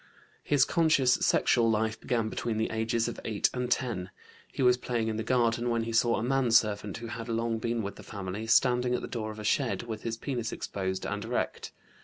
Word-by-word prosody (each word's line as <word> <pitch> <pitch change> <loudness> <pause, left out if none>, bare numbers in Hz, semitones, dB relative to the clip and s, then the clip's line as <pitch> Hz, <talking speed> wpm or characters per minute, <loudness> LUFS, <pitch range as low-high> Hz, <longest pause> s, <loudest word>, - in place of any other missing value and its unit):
His 145 -2 +3
conscious 155 -7 +3
sexual 115 -3 +3
life 110 0 0
began 115 -4 0
between 115 0 -3
the 110 - -1
ages 115 +1 0
of - - -5
8 110 -3 +1
and 125 -1 -2
10. 115 -8 -1 0.4
He - - -2
was 125 0 +6
playing 120 -2 -2
in 110 - -2
the - - -1
garden 120 0 +1
when 115 -1 +1
he 115 - -4
saw 115 +1 +3
a - - -2
manservant 115 -6 +2
who 115 - -8
had 115 0 -6
long 115 0 -1
been 115 0 -1
with 100 - -5
the - - -10
family, 100 +1 -6
standing 125 +1 +3
at - - -2
the - - -4
door 110 -3 -4
of 110 - -8
a 105 - -7
shed 120 +4 0
with 110 -2 -6
his 115 0 -3
penis 120 -3 -3
exposed 95 -1 -3
and - - -3
erect. - - -3
115 Hz, 215 wpm, -29 LUFS, 110-125 Hz, 0.4 s, was